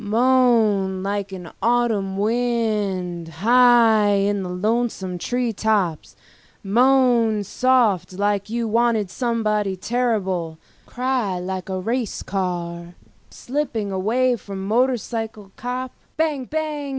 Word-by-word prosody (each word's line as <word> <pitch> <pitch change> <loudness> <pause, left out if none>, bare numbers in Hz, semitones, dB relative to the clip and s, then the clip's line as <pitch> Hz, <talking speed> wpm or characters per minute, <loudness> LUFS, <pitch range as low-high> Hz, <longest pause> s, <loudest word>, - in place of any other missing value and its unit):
Moan 220 -5 +2
like 200 0 -3
an 180 -3 -8
autumn 225 -5 +1
wind 210 -6 -1
high 230 +4 +4
in 200 0 +1
the 185 - -5
lonesome 190 -1 -1
tree 245 +3 -1
tops, 190 - -1 0.5
moan 235 -1 +3
soft 215 -6 +1
like 205 +1 -1
you 235 0 -2
wanted 225 -3 +1
somebody 215 -5 -1
terrible, 190 -7 -1 0.3
cry 250 -7 -1
like 185 +1 -5
a 190 0 -2
racing 230 +3 -3
car 175 -2 -4 0.3
slipping 240 -7 -3
away 240 +7 +1
from 200 -3 -8
a 190 - -5
motorcycle 225 -3 -1
cop, 250 +1 -4 0.3
bang 305 -5 0
bang! 300 -1 -3
215 Hz, 110 wpm, -22 LUFS, 190-245 Hz, 0.5 s, high